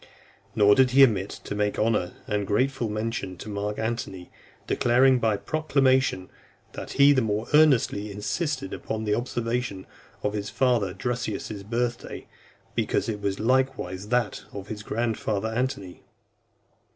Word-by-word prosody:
Nor 105 Hz, -1 st, +6 dB
did 130 Hz, +3 st, +5 dB
he 135 Hz, +2 st, +7 dB
omit 100 Hz, -6 st, +3 dB
to -, -, -5 dB
make 105 Hz, 0 st, 0 dB
honourable 105 Hz, -5 st, 0 dB
and 105 Hz, -1 st, -1 dB
grateful 125 Hz, +3 st, 0 dB
mention 110 Hz, -3 st, -3 dB
of -, -, -8 dB
Mark 105 Hz, 0 st, -3 dB
Antony; 110 Hz, -5 st, -4 dB, 0.3 s
declaring 125 Hz, +2 st, +4 dB
by 110 Hz, -3 st, +2 dB
a -, -, -4 dB
proclamation, 130 Hz, -4 st, +1 dB, 0.4 s
"That -, -, -7 dB
he 140 Hz, +1 st, +6 dB
the 130 Hz, -, +2 dB
more 110 Hz, 0 st, -1 dB
earnestly 135 Hz, -9 st, +4 dB
insisted 105 Hz, -, -3 dB
upon 110 Hz, 0 st, -4 dB
the 105 Hz, -1 st, 0 dB
observation 120 Hz, -3 st, -2 dB, 0.4 s
of 105 Hz, -, 0 dB
his 105 Hz, -1 st, -3 dB
father 115 Hz, -8 st, +1 dB
Drusus's 110 Hz, -2 st, -3 dB
birth 120 Hz, +3 st, -1 dB
day, -, -, -8 dB, 0.5 s
because -, -, 0 dB
it 105 Hz, -2 st, -3 dB
was 100 Hz, -1 st, -2 dB
likewise 110 Hz, -6 st, 0 dB
that 120 Hz, -2 st, 0 dB
of 100 Hz, 0 st, -8 dB
his 105 Hz, -1 st, -5 dB
grandfather 110 Hz, -1 st, -1 dB
Antony." 110 Hz, -6 st, -3 dB
110 Hz, 145 wpm, -26 LUFS, 100-125 Hz, 0.5 s, he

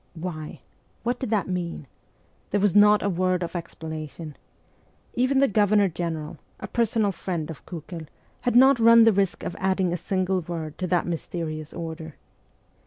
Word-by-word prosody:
Why? 160 Hz, -2 st, -6 dB, 0.4 s
What 245 Hz, +1 st, -1 dB
did 260 Hz, -, -3 dB
that 210 Hz, -5 st, +1 dB
mean? 175 Hz, -5 st, -3 dB, 0.6 s
There 205 Hz, -, +1 dB
was 205 Hz, -1 st, +2 dB
not 210 Hz, 0 st, +6 dB
a -, -, +1 dB
word 185 Hz, -1 st, +1 dB
of 170 Hz, -, -6 dB
explanation. 160 Hz, -2 st, -7 dB, 0.8 s
Even 255 Hz, +3 st, +1 dB
the 275 Hz, +1 st, +5 dB
Governor 205 Hz, -2 st, +3 dB
General, 160 Hz, -2 st, -4 dB, 0.2 s
a -, -, -6 dB
personal 225 Hz, -2 st, +1 dB
friend 170 Hz, -3 st, -4 dB
of 155 Hz, -, -11 dB
Kiikel, 165 Hz, -1 st, -7 dB, 0.3 s
had 245 Hz, -2 st, 0 dB
not 265 Hz, +1 st, +7 dB
run 230 Hz, 0 st, +8 dB
the 225 Hz, -1 st, +6 dB
risk 195 Hz, -1 st, 0 dB
of -, -, -4 dB
adding 190 Hz, -2 st, +1 dB
a -, -, -1 dB
single 185 Hz, +1 st, -1 dB
word 160 Hz, -2 st, -6 dB
to 185 Hz, -, -1 dB
the 175 Hz, -1 st, +2 dB
mysterious 160 Hz, -2 st, -4 dB
order. 160 Hz, -2 st, -7 dB
180 Hz, 165 wpm, -25 LUFS, 165-205 Hz, 0.8 s, run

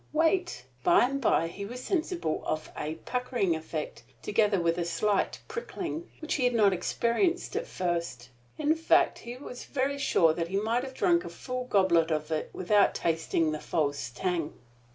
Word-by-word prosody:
Wait! 325 Hz, -, +1 dB, 0.2 s
By 175 Hz, -, +6 dB
and 275 Hz, +2 st, -2 dB
by 165 Hz, -8 st, +3 dB
he 190 Hz, +4 st, -7 dB
was 245 Hz, +5 st, -7 dB
sensible 345 Hz, -, -1 dB
of 155 Hz, 0 st, -3 dB
a 155 Hz, +1 st, -3 dB
puckering 250 Hz, -8 st, 0 dB
effect, 160 Hz, -1 st, -5 dB, 0.2 s
together 210 Hz, -2 st, +2 dB
with 170 Hz, 0 st, +1 dB
a -, -, +1 dB
slight 170 Hz, +5 st, 0 dB
prickling, 375 Hz, -7 st, -5 dB
which 310 Hz, -, -2 dB
he 275 Hz, -, 0 dB
had 245 Hz, -1 st, +2 dB
not 205 Hz, -4 st, +5 dB
experienced 240 Hz, -, 0 dB
at 465 Hz, +3 st, -2 dB
first. 170 Hz, -9 st, -3 dB, 0.3 s
In 305 Hz, 0 st, +2 dB
fact, 325 Hz, 0 st, +3 dB
he 240 Hz, +1 st, -8 dB
was 250 Hz, -2 st, -8 dB
very 280 Hz, +1 st, -1 dB
sure 165 Hz, -, +4 dB
that 165 Hz, 0 st, -2 dB
he 190 Hz, +3 st, -1 dB
might 225 Hz, +4 st, 0 dB
have 265 Hz, -1 st, -7 dB
drunk 345 Hz, +2 st, +3 dB
a -, -, -6 dB
full 255 Hz, -1 st, -5 dB
goblet 185 Hz, -7 st, +3 dB
of 155 Hz, 0 st, -2 dB
it 155 Hz, -, -1 dB
without 200 Hz, +2 st, +3 dB
tasting 165 Hz, -1 st, 0 dB
the 155 Hz, -, -3 dB
false 145 Hz, -6 st, -1 dB
tang. 165 Hz, +4 st, -2 dB
205 Hz, 175 wpm, -29 LUFS, 165-270 Hz, 0.3 s, By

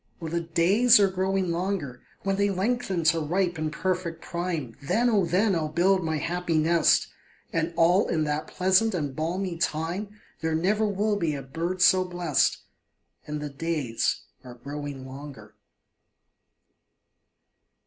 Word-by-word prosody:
Oh, 165 Hz, -, -5 dB
the 170 Hz, +2 st, -1 dB
days 195 Hz, +9 st, +4 dB
are 195 Hz, -2 st, +4 dB
growing 190 Hz, -1 st, 0 dB
longer; 170 Hz, -8 st, -3 dB, 0.2 s
When 195 Hz, 0 st, 0 dB
they 200 Hz, 0 st, +2 dB
lengthen 195 Hz, -2 st, -1 dB
to 165 Hz, +1 st, +3 dB
ripe 175 Hz, +2 st, -1 dB
and 155 Hz, -1 st, -2 dB
perfect 170 Hz, 0 st, -2 dB
prime, 170 Hz, -9 st, -4 dB
Then, 235 Hz, -, +1 dB
oh, 200 Hz, -4 st, +3 dB
then, 195 Hz, +5 st, +2 dB
I 165 Hz, -, 0 dB
will 155 Hz, -, -1 dB
build 185 Hz, +4 st, +2 dB
my 160 Hz, -1 st, -1 dB
happy 170 Hz, +2 st, -1 dB
nest; 165 Hz, +1 st, +3 dB, 0.5 s
And 165 Hz, 0 st, 0 dB
all 175 Hz, +4 st, +4 dB
in 160 Hz, -2 st, 0 dB
that 150 Hz, +1 st, -2 dB
pleasant 190 Hz, +3 st, +2 dB
and 145 Hz, -6 st, -3 dB
balmy 170 Hz, +3 st, -2 dB
time, 180 Hz, +7 st, -2 dB, 0.2 s
There 160 Hz, -1 st, -1 dB
never 205 Hz, +6 st, +1 dB
will 205 Hz, +1 st, 0 dB
be 160 Hz, -5 st, -1 dB
a 140 Hz, -, -6 dB
bird 170 Hz, +7 st, -2 dB
so 185 Hz, 0 st, +5 dB
blest; 175 Hz, -6 st, 0 dB, 0.6 s
And 150 Hz, 0 st, -4 dB
the 150 Hz, -, -4 dB
days 140 Hz, -5 st, -1 dB, 0.2 s
are 125 Hz, -1 st, -10 dB
growing 140 Hz, +1 st, -7 dB
longer. 140 Hz, +1 st, -10 dB
170 Hz, 150 wpm, -26 LUFS, 155-190 Hz, 0.6 s, so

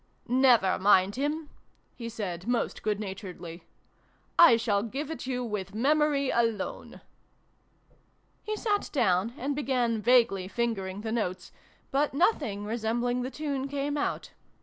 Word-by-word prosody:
" -, -, -41 dB
Nevare 245 Hz, -6 st, +4 dB
mind 195 Hz, 0 st, +4 dB
him! 295 Hz, +3 st, -2 dB, 0.2 s
" -, -, -39 dB
he 230 Hz, -2 st, -6 dB
said, 195 Hz, -5 st, -5 dB
most 245 Hz, -1 st, -1 dB
good 210 Hz, -1 st, -1 dB
naturedly. 190 Hz, -4 st, -7 dB, 0.4 s
" -, -, -25 dB
I 230 Hz, -, +5 dB
shall 210 Hz, -3 st, +1 dB
give 275 Hz, +8 st, -4 dB
it 320 Hz, -, -6 dB
you 250 Hz, -1 st, -2 dB
with 205 Hz, -4 st, -4 dB
memory 285 Hz, +2 st, +2 dB
alone! 230 Hz, -4 st, -2 dB, 0.7 s
" -, -, -38 dB
He 430 Hz, -, -3 dB
sat 420 Hz, -2 st, -1 dB
down, 225 Hz, -, +1 dB
and 280 Hz, +3 st, -2 dB
began 250 Hz, -6 st, 0 dB
vaguely 230 Hz, -6 st, +3 dB
fing 235 Hz, +2 st, -1 dB
ering 190 Hz, +1 st, -6 dB
the 220 Hz, -, -3 dB
notes; 185 Hz, -6 st, -3 dB, 0.4 s
but 280 Hz, 0 st, +1 dB
nothing 280 Hz, -, +1 dB
resembling 240 Hz, +3 st, -1 dB
the 250 Hz, -, -3 dB
tune 280 Hz, -2 st, -3 dB
came 285 Hz, +1 st, -2 dB
out. 290 Hz, -, -2 dB
235 Hz, 150 wpm, -28 LUFS, 205-275 Hz, 0.7 s, I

